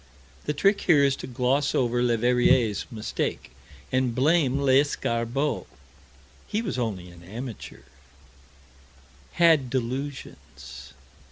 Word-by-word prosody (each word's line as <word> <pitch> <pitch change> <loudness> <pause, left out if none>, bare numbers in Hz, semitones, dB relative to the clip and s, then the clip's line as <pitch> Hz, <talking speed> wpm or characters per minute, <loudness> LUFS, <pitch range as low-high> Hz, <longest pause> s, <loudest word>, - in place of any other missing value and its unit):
The 150 - -1
trick 195 +7 +2
here 150 -5 +4
is 140 -1 +3
to - - -7
gloss 130 +3 0
over 120 -1 +1
Leverrier's 120 -1 +2
mistake, 110 - -4 0.4
and 130 -2 0
blame 140 0 +2
Lescarbault 135 -1 0 0.8
he 215 +2 -2
was 185 - -3
only 95 -7 -4
an 85 -1 -15
amateur 110 - -8 1.5
had 160 -7 +4
delusions. 125 - -6
130 Hz, 100 wpm, -25 LUFS, 115-140 Hz, 1.5 s, here